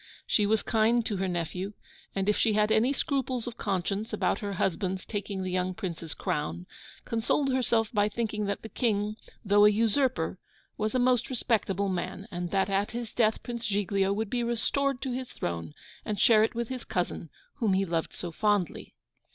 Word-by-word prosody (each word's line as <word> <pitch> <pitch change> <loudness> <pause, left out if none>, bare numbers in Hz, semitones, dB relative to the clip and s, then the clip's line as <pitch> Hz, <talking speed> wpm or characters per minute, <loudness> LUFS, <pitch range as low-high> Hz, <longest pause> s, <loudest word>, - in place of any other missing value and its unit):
She 210 -2 +2
was 220 +1 +2
kind 230 +1 +3
to 205 - -1
her 190 +1 0
nephew; 180 +3 -3 0.4
and 195 0 0
if 210 - +4
she 220 - +2
had 210 +1 +3
any 235 +5 +4
scruples 265 -4 -1
of 240 -1 -6
conscience 200 +2 -1
about 215 - +1
her 200 -1 -3
husband's 185 +1 -1
taking 200 -2 -3
the 185 - -3
young 185 0 0
Prince's 170 -6 -5
crown, 150 +4 -2 0.4
consoled 255 +4 +1
herself 230 -4 +2
by 205 -1 +3
thinking 210 -1 -2
that 200 - -2
the 220 - -7
King, 210 -3 0 0.3
though 205 +1 +5
a 210 - +9
usurper, 215 -4 +1 0.4
was 215 +3 -1
a - - +5
most 250 -1 +3
respectable 205 -6 0
man, 190 +2 -3
and 175 -1 -3
that 195 +1 +2
at 200 +1 +1
his 235 -1 -5
death 220 -2 +2
Prince 235 -1 -4
Giglio 195 -1 +1
would 210 +1 -1
be 245 - 0
restored 250 +3 0
to 265 - -2
his 255 0 -4
throne, 85 -3 -4 0.3
and 210 -1 -3
share 220 -2 +6
it 225 - 0
with 235 -1 -2
his 255 -1 -4
cousin, - - -2 0.3
whom 215 -5 +2
he 195 +1 +2
loved 165 -2 -1
so 175 - -5
fondly. 205 -1 0
210 Hz, 190 wpm, -29 LUFS, 190-235 Hz, 0.4 s, a